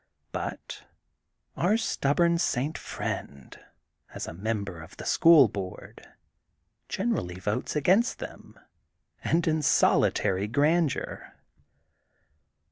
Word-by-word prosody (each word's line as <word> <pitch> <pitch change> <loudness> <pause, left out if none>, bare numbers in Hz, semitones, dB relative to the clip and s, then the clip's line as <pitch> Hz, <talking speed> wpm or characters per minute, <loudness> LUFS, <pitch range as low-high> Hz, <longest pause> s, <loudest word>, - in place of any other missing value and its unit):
But - - -6 0.7
our 200 +6 +2
stubborn 170 -4 +1
St. 145 -2 -1
Friend, 70 -2 -6 0.6
as - - -4
a - - -6
member 100 -2 -4
of 80 +3 -13
the - - -8
school 165 -6 +6
board, 95 -2 -8 0.8
generally 90 +1 -2
votes 105 +10 -2
against 185 - +3
them, - - -10 0.7
and 170 +1 +1
in 160 -1 +1
solitary 100 -7 +2
grandeur. 150 +5 0
135 Hz, 95 wpm, -27 LUFS, -, 0.8 s, school